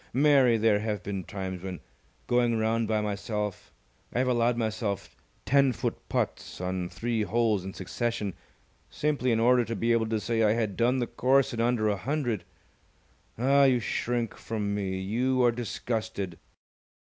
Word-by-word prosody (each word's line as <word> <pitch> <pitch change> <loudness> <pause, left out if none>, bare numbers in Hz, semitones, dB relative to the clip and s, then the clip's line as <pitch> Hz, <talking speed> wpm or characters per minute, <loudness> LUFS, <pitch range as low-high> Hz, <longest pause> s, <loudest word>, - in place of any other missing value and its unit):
Mary, 135 -4 +5
there 110 -1 +3
have 105 -2 -3
been 100 -2 -4
times 95 0 -5
when, 95 -2 -6 0.5
going 120 -1 +2
round 110 +1 +1
by 110 -1 +1
myself, 105 0 -3 0.4
I - - -4
have 130 +1 +2
allowed 120 -1 +2
myself 110 -3 -2 0.3
ten 140 -1 +4
foot 95 - -2
putts - - -2
on 90 -1 -2
three 115 +2 -2
holes 110 -2 +1
in 95 0 -7
succession, 105 +1 -2 0.6
simply 145 -4 0
in 115 - +2
order 125 +1 +4
to 115 0 -4
be 115 +1 0
able 115 -1 +2
to 110 -1 0
say 115 +1 0
I 105 -1 +4
had 110 -4 -1
done 120 +4 +2
the 125 - 0
course 130 +3 +2
in 115 - -1
under 115 -2 +2
a 105 -1 +1
hundred. 120 -2 -2 0.9
Ah! 140 +4 +4
you 130 -2 +4
shrink 120 0 -2
from 105 -2 -3
me! 95 -2 -2
You 125 +7 +1
are 120 - +5
disgusted!" 110 -5 -4
115 Hz, 165 wpm, -28 LUFS, 105-120 Hz, 0.9 s, Mary